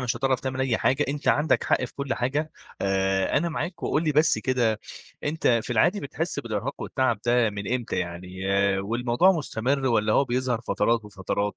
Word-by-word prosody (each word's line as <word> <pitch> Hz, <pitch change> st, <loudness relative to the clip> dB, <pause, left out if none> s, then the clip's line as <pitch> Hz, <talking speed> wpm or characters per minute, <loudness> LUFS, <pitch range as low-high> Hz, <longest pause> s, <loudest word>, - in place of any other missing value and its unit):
مش 125 Hz, -1 st, -1 dB
هتعرف 135 Hz, -1 st, +1 dB
تعمل 130 Hz, 0 st, -3 dB
أي 130 Hz, -4 st, +1 dB
حاجة، 140 Hz, +3 st, +2 dB
أنت 145 Hz, +1 st, -2 dB
عندك 150 Hz, -1 st, +2 dB
حق -, -, +2 dB
في 120 Hz, -, -9 dB
كُلّ 140 Hz, -1 st, -2 dB
حاجة، 145 Hz, +6 st, -1 dB, 0.3 s
آآ 95 Hz, 0 st, +1 dB
أنا 170 Hz, -, -1 dB
معاك، 170 Hz, +2 st, -4 dB
وقُل 155 Hz, -, 0 dB
لي 155 Hz, -, +1 dB
بس 155 Hz, +2 st, +4 dB
كده 120 Hz, -5 st, 0 dB, 0.4 s
أنت 155 Hz, +2 st, -2 dB, 0.2 s
في 120 Hz, -, -8 dB
العادي 180 Hz, -, +3 dB
بتحِسّ 160 Hz, +5 st, -3 dB
بالإرهاق 110 Hz, -3 st, -4 dB
والتعب 130 Hz, -5 st, 0 dB
ده 120 Hz, -2 st, +3 dB
من 100 Hz, +2 st, -4 dB
إمتى 120 Hz, -3 st, -3 dB
يعني، 90 Hz, +2 st, -5 dB, 0.3 s
والموضوع 120 Hz, -, +2 dB
مُستمر 135 Hz, -4 st, -1 dB
والّا 110 Hz, -3 st, +2 dB
هو 140 Hz, -, +4 dB
بيظهر 125 Hz, -1 st, -1 dB
فترات 115 Hz, 0 st, 0 dB
وفترات، 100 Hz, 0 st, -3 dB
125 Hz, 180 wpm, -25 LUFS, 110-140 Hz, 0.4 s, بس